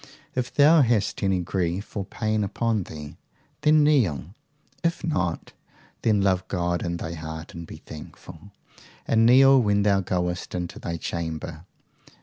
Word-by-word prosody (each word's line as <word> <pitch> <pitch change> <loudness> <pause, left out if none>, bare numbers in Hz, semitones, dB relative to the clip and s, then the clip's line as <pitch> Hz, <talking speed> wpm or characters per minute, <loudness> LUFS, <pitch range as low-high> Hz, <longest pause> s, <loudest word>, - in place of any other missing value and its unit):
If 125 -1 -2
thou 150 +2 +6
hast 115 -5 +1
any 95 -2 +1
grief 90 +3 -3
or 100 -2 -2
pain 110 0 -1
upon 110 0 -1
thee, 75 -2 -9 0.4
then 150 0 +5
kneel; 95 - +1 0.5
if 170 0 -1
not, 90 - -2 0.5
then 105 -3 +2
love 95 -1 +1
God 85 -1 -1
in 85 0 -2
thy 85 0 -5
heart 80 0 -7
and 85 -1 -8
be - - -9
thankful, 80 +4 -11 0.6
and 115 0 +4
kneel 135 +2 +7
when 100 -2 +2
thou 100 -1 +3
goest 90 0 -2
into 90 -1 -4
thy 85 0 -4
chamber. 80 0 -5
95 Hz, 145 wpm, -25 LUFS, 85-115 Hz, 0.6 s, kneel